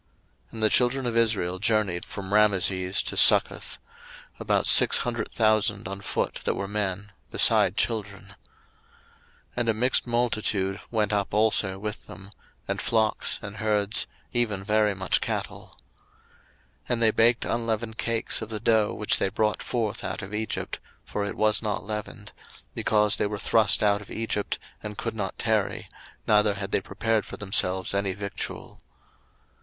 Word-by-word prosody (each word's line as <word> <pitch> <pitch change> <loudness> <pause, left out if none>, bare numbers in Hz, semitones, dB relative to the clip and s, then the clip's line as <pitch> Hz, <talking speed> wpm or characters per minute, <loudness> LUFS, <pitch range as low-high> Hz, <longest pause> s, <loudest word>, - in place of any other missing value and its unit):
02:012:037 - - -30
And 110 -1 -5
the 110 - +6
children 130 +1 +2
of 120 -1 -1
Israel 105 -6 +2
journeyed 105 -4 0
from 100 -1 -7
Rameses 95 -3 +2
to - - -3
Succoth, - - +4 0.6
about - - +1
six - - +7
hundred 120 -2 -2
thousand 110 -3 +1
on 95 +1 -6
foot - - -2
that - - 0
were 100 - -4
men, 100 -1 -3 0.2
beside - - +3
children. 105 -4 -1
02:012:038 100 - -13 1.2
And 120 -1 0
a - - +4
mixed 125 +3 +2
multitude 110 -5 0
went 105 -3 0
up 100 0 -1
also 105 -3 +1
with 105 +1 -6
them; 95 +3 -12 0.4
and - - -2
flocks, 110 -2 0
and 105 +1 -8
herds, 105 -1 0 0.3
even 110 -6 +1
very 105 0 +2
much 95 0 0
cattle. - - -4 1.2
02:012:039 - - -24
And 120 -1 0
they 110 - +6
baked 115 +2 +3
unleavened 115 -1 -2
cakes 115 0 0
of 110 - -6
the 110 -1 -3
dough 110 -1 +2
which 105 - +2
they - - +1
brought 105 +1 0
forth 110 -4 -2
out - - -4
of 100 +1 -9
Egypt, 110 0 -3 0.3
for 105 - -3
it 100 - -4
was 110 0 +2
not 105 -5 -3
leavened; 105 0 -6 0.4
because 105 -1 +1
they - - 0
were 105 0 -4
thrust 110 0 +3
out 105 0 +2
of 105 - -14
Egypt, 110 -2 -3 0.2
and 105 -1 -7
could 115 - -3
not 95 -3 -4
tarry, 110 -3 -1 0.4
neither 105 -1 +3
had 100 0 -5
they - - +1
prepared 110 +3 -1
for - - -9
themselves 95 -2 0
any 100 -1 0
victual. 100 0 -6
105 Hz, 160 wpm, -26 LUFS, 100-110 Hz, 1.2 s, six